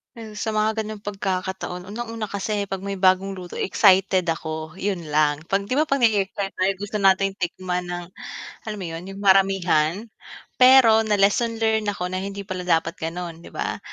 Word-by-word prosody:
'Yan 220 -2 -10
sa 220 +1 -2
mga 215 +1 0
gano'ng 215 -1 -7
pagkakataon 190 -2 -3
unang-una 225 0 -5
kasi 200 0 -2
'pag 195 0 -5
may 200 -1 -4
bagong 190 +1 +3
luto 180 -2 -8
excited 190 -2 +3
ako, 160 0 -4
'yun 190 -4 -3
lang. 150 -1 +2
'Pag 195 +1 +1
'di 255 +8 -1
ba 310 - +2
'pag 275 -3 0
na-e-excite 200 -2 +1
tayo 185 +1 +1
gusto 205 +2 -4
nating 195 0 +4
tikman 180 0 -3
ng, 175 0 -5 0.6
alam 215 - -3
mo 185 - -5
'yun, 165 +2 -6
'yung 195 +1 -8
maramihan. 190 -2 +3 0.6
Pero 255 -3 +7
na-lesson 210 +3 +2
learn 220 -1 +1
ako 180 -3 -2
na 185 - -2
hindi 200 0 -5
pala 185 -2 -5
dapat 165 -1 +1
gano'n, 165 0 -5
'di - - -12
ba? - - -3
195 Hz, 175 wpm, -23 LUFS, 180-210 Hz, 0.6 s, Pero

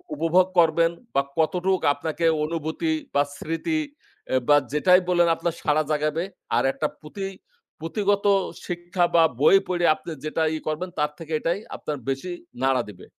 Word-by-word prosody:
উপভোগ 180 - +3
করবেন 165 0 +4 0.2
বা 140 - +5 0.2
কতটুক 180 +4 +1
আপনাকে 160 +3 -3 0.2
অনুভূতি 160 - -2 0.2
বা 140 - +5
স্মৃতি 240 - -2 0.5
এ - - +3
বা 145 - +7 0.2
যেটাই 180 +5 +5
বললেন, 175 -1 +4
আপনার 170 0 -2
সাড়া 155 0 +2
জাগাবে। 155 +2 0 0.3
আর - - +3
একটা 150 - -1
পুঁথি 195 +6 -6 0.5
পুঁথিগত 200 +5 0 0.4
শিক্ষা 175 0 -1
বা 165 - +7 0.2
বই 155 - +7
পইড়া, 175 -1 +1
আপনি - - -11 0.2
যেটা 155 +1 -2
ইয়ে 155 -1 -5
করবেন, 155 +4 -2
তার 150 0 +1
থেকে 165 -1 -7
এটাই 170 +5 -1 0.2
আপনার 150 - -4
বেশি 135 +7 -3 0.3
নাড়া 135 -1 +3
দিবে। 100 - -12
165 Hz, 155 wpm, -24 LUFS, 150-180 Hz, 0.5 s, বা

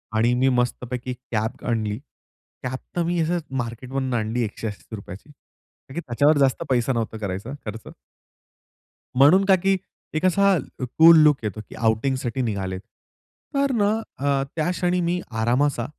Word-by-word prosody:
आणि 120 +2 +3
मी 130 +2 +3
मस्तपैकी 125 0 -2 0.2
कॅप 110 0 -2
आणली. 110 -3 -1 0.7
कॅप 130 +1 -3 0.2
तर 175 - +1
मी 175 +1 0
असंच 170 0 0 0.2
मार्केट 120 +2 -8
मधून 130 -1 -1
आणली 115 +1 0
₹180. 105 0 -7 0.6
का - - -10
की 170 - -3
त्याच्यावर 145 +2 +2
जास्त 135 -2 +2
पैसा 125 0 +2
नव्हता 115 -1 -2
करायचा 100 +3 -4
खर्च. 110 +1 -7 1.2
म्हणून 160 +9 +7
का 195 -1 +6
की 195 0 +3 0.4
एक 155 - 0
असा 195 +1 +4 0.2
क - - -4
कूल 165 0 +9
लूक 150 -2 +5
येतो 105 0 -3
की - - -10
आउटिंगसाठी 120 +3 0
निघालेत. 95 -5 -2 0.8
तर 275 -1 +2
ना 205 -4 +2 0.3
अ, 140 0 +1
त्या 160 +1 0
क्षणी 180 0 0
मी 175 +1 0
आरामाचा 120 +3 +1
130 Hz, 150 wpm, -23 LUFS, 115-160 Hz, 1.2 s, कूल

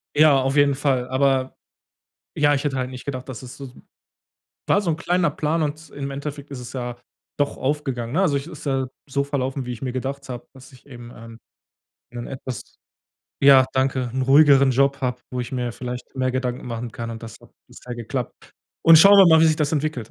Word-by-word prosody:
Ja, 150 -2 +6
auf 135 +1 -1
jeden 145 -1 +4
Fall. 130 -3 0
Aber 130 0 +1 0.8
ja, 145 -1 +3
ich 140 - -1
hätte 140 -2 -1
halt 130 -1 -2
nicht 130 -1 -9
gedacht, 130 -2 -6
das 130 -2 -7
ist 125 -1 -9
s - - -12
so, 135 -3 -11 0.9
war 205 - +3
so 190 - -2
'n 160 - 0
kleiner 175 +1 +1
Plan 160 +2 -1
und 155 +1 -4
im 140 -1 -5
Endeffekt 140 +1 -6
ist 140 - -7
es 125 - -9
ja 120 -2 -5 0.4
doch 145 -1 -1
aufgegangen, 130 -4 -2
ne? 175 - +2
Also, 150 -7 +2
ich 140 - -6
ist 160 -2 -10
ja 135 -2 0 0.2
so 140 0 -1
verlaufen, 135 -2 -3
wie 125 - -5
ich 120 - -10
mir 130 - -2
gedacht 135 +2 -5
habe, 120 -1 -7
dass 130 0 -15
ich 130 +2 -19
eben, 120 -2 -11
ähm, 115 0 -12 0.7
in 120 -1 -6
etwas 130 -2 -8 0.6
ja, 135 -1 +7
danke, 130 -1 0
'n 130 - 0
ruhigeren 140 0 +6
Job 140 +2 +2
habe, 125 -1 -2
wo 125 - -3
ich 120 - -5
mir 125 -2 -2
vielleicht 125 +1 -7
mehr 130 0 0
Gedanken 125 -1 -3
machen 120 0 -5
kann 115 -1 -6
und 115 0 -8
das 115 - -10
hat - - -19 0.2
bisher 125 - -10
geklappt. 120 +1 -6 0.3
Und 165 -1 +9
schauen 200 +5 +8
wir 195 - +9
mal, 160 -1 +6
wie 165 - +6
sich 155 -1 +2
das 150 -2 0
entwickelt. 145 -7 -2
135 Hz, 220 wpm, -22 LUFS, 125-145 Hz, 0.9 s, Und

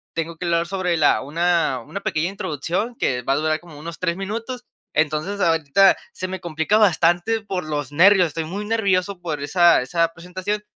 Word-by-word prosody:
tengo 165 0 -3
que 180 - -5
hablar 170 0 +1
sobre 180 -2 -1
la 155 -3 +3
una 165 -2 +1
una 200 - -6
pequeña 165 -2 -1
introducción 190 - -3
que 125 -1 0
va 135 - +1
a - - +2
durar 155 +1 0
como 160 -4 -14
unos 165 +2 -7
3 170 -2 -1
minutos. 225 +6 -5 0.3
Entonces, 155 +6 0
ahorita 165 +2 +4 0.2
se 185 - -4
me 190 0 -5
complica 165 +4 0
bastante 180 +2 +2
por 195 -3 -4
los 145 -2 -4
nervios, 185 +4 +6
estoy 160 +1 -4
muy 200 +6 -5
nervioso 200 -4 0
por 160 -4 -3
esa 170 +1 +4
esa 165 +4 0
presentación. 185 +5 -4
175 Hz, 185 wpm, -22 LUFS, 160-195 Hz, 0.3 s, nervios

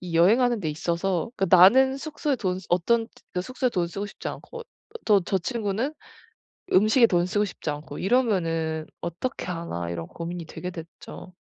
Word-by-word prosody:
이 175 -2 -6
여행하는 230 +7 +4
데 165 - -2
있어서 170 +5 -1
그 195 - +1
나는 235 +10 +7
숙소에 295 -1 -2
돈 185 -5 -1
쓰 190 - -12
어떤 225 +7 +2 0.3
그 180 - -1
숙소에 255 +6 -1
돈을 180 -7 -1
쓰고 200 +4 -4
싶지 - - -7
않고 475 - -8 0.4
또 205 -3 +5
저 190 - 0
친구는 225 - -2 0.8
음식에 215 +5 +5
돈 175 -3 +2
쓰고 205 +3 +1
싶지 185 - -6
않고 150 +1 -6
이러면은 165 -9 +1 0.2
어떻게 170 +10 -4
하나?' 165 - -4
이런 85 -1 -5
고민이 170 0 -6
되게 180 +3 -6
됐죠. 170 +2 -10
185 Hz, 335 characters per minute, -25 LUFS, 170-230 Hz, 0.8 s, 나는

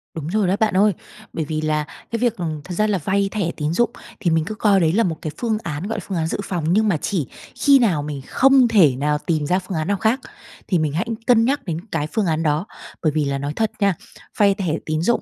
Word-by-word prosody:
Đúng 155 -2 -5
rồi 200 +2 +1
đó 185 - +2
bạn 220 -2 +2
ơi. 205 +1 +4 0.4
Bởi 160 -2 -2
vì 155 0 -3
là 155 -1 0 0.3
cái 230 - -1
việc, 235 -1 +1
ừm, 160 -4 -3
thật 180 - -7
ra 215 +4 +2
là 205 -2 +1
vay 195 +4 0
thẻ 195 -6 -1
tín 150 +1 -1
dụng 240 +6 +2 0.3
thì 170 - +1
mình 160 -1 +2
cứ 215 - -5
coi 205 -3 +3
đấy 160 -2 +2
là 230 +4 +3
một 165 -5 -1
cái 155 - -4
phương 225 -3 0
án, 160 +3 -4
gọi 225 - -3
là, - - -10
phương 190 - -2
án 160 -1 0
dự - - -2
phòng, 180 -4 -3
nhưng 215 +2 +3
mà 190 -6 +2
chỉ 160 - -2 0.3
khi 280 -1 +5
nào 190 - +2
mình 145 -2 -5
không 270 -1 +5
thể 185 - +5
nào 150 +3 0
tìm 155 0 -1
ra 180 +5 +2
phương 185 -2 -5
án 155 +1 -2
nào 200 0 +1
khác 220 +7 +1 0.5
thì 180 -4 +2
mình 155 -2 -1
hãy 175 +8 -1 0.2
cân 230 -2 +5
nhắc 280 +4 0
đến 165 -4 -3
cái 150 -2 -1
phương 220 - +1
án 160 -2 0
đó. 155 +3 +1 0.4
Bởi 155 - +3
vì 150 0 0
là 140 0 -1
nói 140 +1 -3
thật 220 -1 0
nha, 200 -2 +3 0.4
vay 200 -1 +5
thẻ 185 -6 -1
tín 155 0 -1
dụng 235 +8 +2
180 Hz, 270 wpm, -21 LUFS, 155-215 Hz, 0.5 s, khi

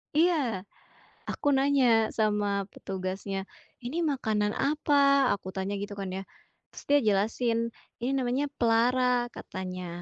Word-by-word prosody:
Iya. 295 - +2 0.7
Aku 290 -1 0
nanya 265 -5 +4
sama 205 -2 +1
petugasnya, 190 +1 -4 0.4
"Ini 310 +8 -2
makanan 220 -9 0
apa"? 280 -2 +3
Aku 185 -1 -9
tanya 195 +1 -3
gitu 205 +1 -5
kan 195 - -3
ya, 195 - -4 0.5
terus - - -11
dia 290 0 +6
jelasin, 220 +3 +1 0.4
"Ini 255 +3 -1
namanya 260 +3 0
pelara," 245 +1 +2
katanya. 185 -1 -6
230 Hz, 120 wpm, -28 LUFS, 200-270 Hz, 0.7 s, dia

